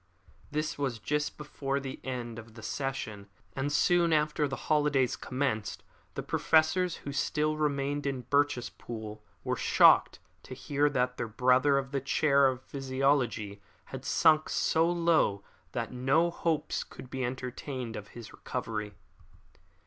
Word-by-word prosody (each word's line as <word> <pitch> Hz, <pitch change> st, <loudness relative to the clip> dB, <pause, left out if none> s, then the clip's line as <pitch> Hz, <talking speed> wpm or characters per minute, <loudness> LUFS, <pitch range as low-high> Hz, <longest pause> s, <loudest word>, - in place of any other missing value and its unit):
This 150 Hz, 0 st, -2 dB
was 135 Hz, -5 st, -1 dB
just 150 Hz, +5 st, -2 dB
before 140 Hz, -2 st, -3 dB
the 135 Hz, -1 st, -6 dB
end 120 Hz, -3 st, -5 dB
of 110 Hz, -1 st, -13 dB
the 110 Hz, -, -11 dB
session 110 Hz, -8 st, -4 dB, 0.3 s
and 135 Hz, +2 st, -1 dB
soon 170 Hz, +3 st, +3 dB
after 150 Hz, -1 st, +2 dB
the 135 Hz, -, -4 dB
holidays 145 Hz, -4 st, +2 dB
commenced 125 Hz, -5 st, -2 dB, 0.3 s
the -, -, -3 dB
professors 165 Hz, +3 st, +2 dB
who 140 Hz, -, -3 dB
still 150 Hz, +2 st, 0 dB
remained 145 Hz, -1 st, -1 dB
in 135 Hz, -2 st, -3 dB
Birchespool 120 Hz, -5 st, -2 dB, 0.2 s
were -, -, -1 dB
shocked -, -, +5 dB, 0.2 s
to 130 Hz, -, -9 dB
hear 145 Hz, +2 st, +1 dB
that 125 Hz, -2 st, 0 dB
their -, -, -2 dB
brother 130 Hz, +5 st, +3 dB
of 135 Hz, 0 st, -2 dB
the 140 Hz, -1 st, -1 dB
chair 140 Hz, 0 st, +3 dB
of 130 Hz, -1 st, -2 dB
physiology 130 Hz, -7 st, -1 dB, 0.3 s
had -, -, -5 dB
sunk 155 Hz, -2 st, +3 dB
so 165 Hz, +1 st, +2 dB
low 165 Hz, -, +2 dB, 0.3 s
that -, -, -3 dB
no 135 Hz, +7 st, +2 dB
hopes 160 Hz, -2 st, -1 dB
could 130 Hz, -, -12 dB
be 130 Hz, -1 st, -3 dB
entertained 125 Hz, -1 st, -4 dB
of 105 Hz, -1 st, -7 dB
his 115 Hz, -2 st, -10 dB
recovery. 105 Hz, -2 st, -4 dB
135 Hz, 140 wpm, -30 LUFS, 125-150 Hz, 0.3 s, shocked